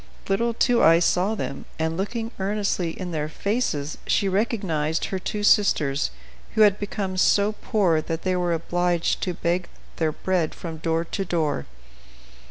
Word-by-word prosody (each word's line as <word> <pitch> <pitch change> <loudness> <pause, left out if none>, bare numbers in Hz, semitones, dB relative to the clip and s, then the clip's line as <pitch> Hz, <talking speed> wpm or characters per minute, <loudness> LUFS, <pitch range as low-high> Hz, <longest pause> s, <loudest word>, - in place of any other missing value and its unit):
Little 230 +4 +1
Two 245 0 +3
Eyes 165 +1 +6
saw 190 +5 +2
them, 140 -9 -5
and, 160 0 -1
looking 225 +5 -3
earnestly 195 -4 -1
in 180 -2 -4
their 155 -2 -2
faces, 160 - -2
she 200 - +2
recognized 190 -7 0
her 190 - -3
two 210 +3 -3
sisters, 150 -10 +3 0.5
who 220 - +3
had 210 -1 +5
become 200 -2 -3
so 200 +2 +4
poor 190 -7 +1
that 165 +1 -4
they 185 -1 +1
were 175 -1 0
obliged 175 +1 0
to 180 -2 -2
beg 170 +2 -1 0.3
their 160 -2 +1
bread 175 0 -1
from 165 -2 -6
door 165 +1 0
to 195 - -3
door. 160 - -1
180 Hz, 160 wpm, -24 LUFS, 165-205 Hz, 0.5 s, Eyes